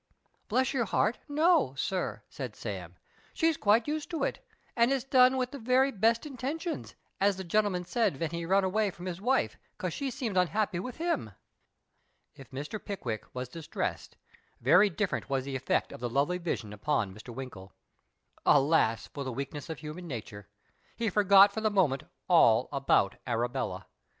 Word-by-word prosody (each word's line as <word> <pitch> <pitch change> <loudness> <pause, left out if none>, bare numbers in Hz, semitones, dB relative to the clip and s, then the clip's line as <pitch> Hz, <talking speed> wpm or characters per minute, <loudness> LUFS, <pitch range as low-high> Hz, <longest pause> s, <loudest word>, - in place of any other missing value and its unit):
Bless 255 +4 +1
your 245 -4 +1
heart, 215 +2 +1
no, 300 - +3
sir," 185 +6 -2
said 125 -6 -7
Sam, 90 -5 -6 0.2
" - - -31
she's 325 0 +2
quite 220 0 +3
used 305 +1 -3
to 325 -5 -2
it, - - -2 0.3
and 235 +2 +4
it's 270 -3 +1
done 260 -1 +5
with 255 -1 -1
the 280 - -7
very 255 +3 +3
best 230 +4 +2
intentions, 295 +5 -4 0.2
as 200 -1 +3
the 190 - -5
gcn'l'man 185 -1 +1
said 200 - 0
ven 165 0 -2
he 170 0 -3
run 190 +3 +3
away 205 +3 +1
from 180 -1 -10
his 180 0 -5
wife, 260 +5 +1 0.2
'cos - - -3
she 280 -1 -2
seemed 230 -6 -3
unhappy 185 +1 +1
with 245 +6 -6
him." 320 - -2 1.0
If 135 - -14
Mr. 150 +11 -6
Pickwick 125 - -4
was 125 0 -3
distressed, 160 +5 -5 0.4
very 180 - +5
different 195 -4 -2
was 135 -1 0
the 140 -1 -4
effect 135 0 0
of - - -9
the 120 0 -3
lovely 145 +8 +1
vision 120 - -3
upon 105 -3 -1
Mr. 110 +5 -12
Winkle. 115 -7 -8 0.7
Alas 140 -6 +3
for 140 - -7
the 130 - -4
weakness 140 +5 -5
of 160 - -4
human 155 +4 -8
nature! 105 -7 -7 0.5
he 225 -3 -1
forgot 200 0 +7
for 220 - -3
the 215 - +2
moment 175 -10 +1 0.2
all - - +5
about - - +2
Arabella. 120 +1 -2
185 Hz, 175 wpm, -30 LUFS, -, 1.0 s, forgot